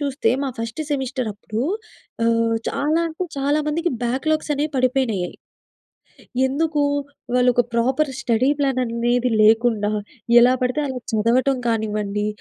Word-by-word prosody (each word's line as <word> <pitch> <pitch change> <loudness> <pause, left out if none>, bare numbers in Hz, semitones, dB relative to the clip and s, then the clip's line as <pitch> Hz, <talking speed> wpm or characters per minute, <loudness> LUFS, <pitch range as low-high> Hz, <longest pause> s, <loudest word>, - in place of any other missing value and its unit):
చూస్తే 275 -4 0
మా 275 - -1
first 230 +5 -4
semester 260 -4 -2
అప్పుడు 215 +2 -5 0.6
ఆహ్, 230 0 +2
చాలా 305 +3 0
అంటే, 325 +3 -4
చాలా 285 +2 +1
మందికి 335 +3 0
బ్యాక్‌లాగ్స్ 300 +6 -1
అనేవి 295 +2 -1
పడిపోయినాయయి. 250 -8 0 1.1
ఎందుకు? 295 +2 0 0.5
వాళ్ళు 250 0 +4
ఒక 245 - +4
ప్రాపర్ 260 +5 +1
స్టడీ 245 +3 +2
ప్లాన్ 270 -2 +1
అనేది 235 +1 -1
ఏది 250 0 +1
లేకుండా, 220 -1 +3 0.5
ఎలా 250 +2 +5
పడితే 250 +4 0
అలా 260 -2 -4
చదవటం 245 +5 +2
కానివ్వండి, 210 -2 -1
250 Hz, 130 wpm, -21 LUFS, 230-280 Hz, 1.1 s, ఎలా